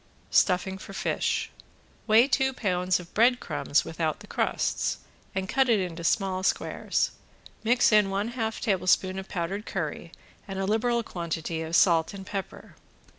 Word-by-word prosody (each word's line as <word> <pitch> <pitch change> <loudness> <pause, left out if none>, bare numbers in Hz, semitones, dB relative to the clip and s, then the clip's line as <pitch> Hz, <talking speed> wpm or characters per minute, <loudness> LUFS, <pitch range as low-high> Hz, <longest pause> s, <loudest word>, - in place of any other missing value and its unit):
~STUFFING 190 +1 +2
FOR 195 - -10
FISH~ - - -1 0.6
Weigh 225 +4 +6
two 265 -1 +1
pounds 180 -5 0
of 175 -1 -12
breadcrumbs 245 +3 +2
without - - -2
the - - -10
crusts, - - -1 0.4
and 190 0 -2
cut 265 +4 +2
it 225 -3 +4
into 175 -2 -4
small 185 +1 +1
squares, 190 - 0 0.5
mix 240 +2 +4
in 210 -2 +5
one 200 +3 -1
half 225 -2 -3
tablespoon 185 -1 +1
of 190 - -9
powdered 190 +3 -3
curry 170 -2 -4 0.4
and 195 -1 -5
a 195 - -1
liberal 235 +3 +1
quantity 165 -4 -4
of 160 +1 -2
salt 170 0 +4
and 195 -1 -8
pepper. 195 0 -6
195 Hz, 150 wpm, -27 LUFS, 180-220 Hz, 0.6 s, Weigh